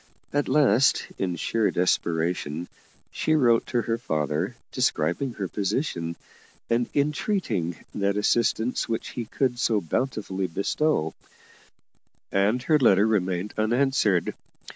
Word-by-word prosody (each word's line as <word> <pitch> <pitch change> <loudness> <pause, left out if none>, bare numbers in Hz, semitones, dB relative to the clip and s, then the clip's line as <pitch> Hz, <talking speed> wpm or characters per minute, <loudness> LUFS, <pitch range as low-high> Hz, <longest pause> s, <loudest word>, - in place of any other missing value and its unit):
At 145 0 +1
last, 140 -3 +4
in 90 -2 -1
sheer 110 +6 0
desperation, 85 -2 0 0.4
she 155 - +1
wrote 120 -6 +3
to 120 -2 0
her 115 0 -1
father 75 - -1 0.2
describing 85 - 0
her 100 -4 -3
position, 95 - -2 0.6
and 120 +1 +1
entreating 140 - 0 0.2
that 100 0 0
assistance 115 +3 +1
which 115 - -2
he 120 - -5
could 125 +1 -1
so 115 -4 +2
bountifully 95 - -2
bestow 100 - 0 1.2
and 105 +6 +2
her 155 +1 +3
letter 105 -6 +5
remained 95 -2 0
unanswered. 115 -4 +2
110 Hz, 115 wpm, -25 LUFS, 90-125 Hz, 1.2 s, letter